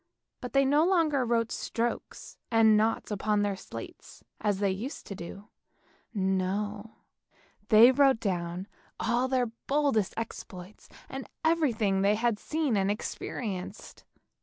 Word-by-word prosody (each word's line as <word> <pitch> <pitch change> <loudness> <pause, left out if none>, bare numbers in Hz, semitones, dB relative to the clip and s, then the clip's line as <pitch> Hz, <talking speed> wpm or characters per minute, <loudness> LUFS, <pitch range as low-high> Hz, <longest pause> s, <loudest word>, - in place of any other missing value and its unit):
But 250 -2 -7
they 275 0 +4
no 290 +3 +4
longer 325 -7 +2
wrote 230 -1 0
strokes 235 +1 -4
and 225 -2 +5
noughts 220 +1 +1
upon 210 0 +1
their 200 -1 0
slates - - -10 0.2
as 205 -2 0
they 200 -1 +1
used 225 +10 -5
to 200 - -7
do; 195 +4 -9 0.6
no, 205 +2 -2 0.7
they 225 +4 +8
wrote 270 -2 +4
down 180 -2 -3 0.3
all 245 +2 +1
their 255 -1 +1 0.2
boldest 275 -8 +1
exploits, 195 -4 -8 0.2
and 270 0 -7 0.2
everything 235 -12 +2
that 200 - +3
they 210 - +4
had 225 -1 0
seen 305 -6 -1
and 195 0 +1
experienced. 205 -1 -5
220 Hz, 135 wpm, -29 LUFS, 200-260 Hz, 0.7 s, they